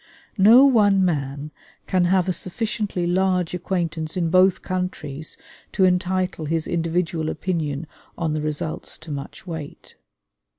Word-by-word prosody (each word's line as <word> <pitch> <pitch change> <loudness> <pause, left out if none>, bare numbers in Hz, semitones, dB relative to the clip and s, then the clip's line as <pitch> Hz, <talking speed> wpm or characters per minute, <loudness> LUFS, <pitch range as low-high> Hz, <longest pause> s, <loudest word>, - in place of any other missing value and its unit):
No 230 +8 +8
one 205 -7 +4
man 145 -2 -2 0.3
can 185 -2 +2
have 185 0 +2
a 185 - +1
sufficiently 205 -1 -2
large 180 -1 +1
acquaintance 170 -3 -2
in 170 -2 0
both 185 0 +4
countries 180 -5 -4 0.4
to 190 - +3
entitle 180 -2 0
his 160 +1 -1
individual 165 -1 -1
opinion 160 -5 -2 0.3
on 160 -2 -1
the 155 - -1
results 155 +1 -3
to 155 0 -10
much 140 +4 -7
weight. 160 -5 -8
175 Hz, 130 wpm, -23 LUFS, 155-185 Hz, 0.4 s, No